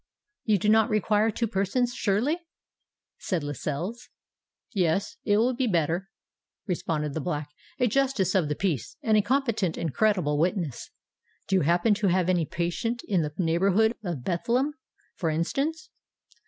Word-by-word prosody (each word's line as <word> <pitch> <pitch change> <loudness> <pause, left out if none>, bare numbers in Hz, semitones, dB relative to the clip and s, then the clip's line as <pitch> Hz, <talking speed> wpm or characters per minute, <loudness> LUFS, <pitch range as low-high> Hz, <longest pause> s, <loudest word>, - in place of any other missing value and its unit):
"You 215 -2 +3
do 200 - -1
not 220 +1 +5
require 215 0 +2
two 230 +2 -1
persons, 230 +4 0
surely?" 240 - +1 0.8
said 175 -6 -2
Lascelles. 155 - -4 0.6
"Yes—it 195 +3 +1
will 240 +4 +3
be 255 +1 0
better," 175 0 0 0.6
responded 155 -6 -2
the 160 - -2
Black; 150 -2 -3 0.3
"a 250 - +4
Justice 245 -6 +1
of 175 -6 +2
the 150 - 0
Peace, 165 - -2
and 220 -1 +3
a 210 - +5
competent 225 - 0
and 160 -5 -2
credible 180 -9 +2
witness. 170 - -1 0.6
Do 195 - +3
you - - +2
happen 175 +7 +3
to 205 0 0
have 185 0 +2
any 175 -4 +2
patient 230 +8 -2
in 190 -4 +2
the 150 -1 -2
neighbourhood 195 +6 +3
of 170 -10 -4
Bethlem, 240 - 0 0.4
for 165 - -2
instance?" 275 - -2
195 Hz, 150 wpm, -27 LUFS, 170-225 Hz, 0.8 s, not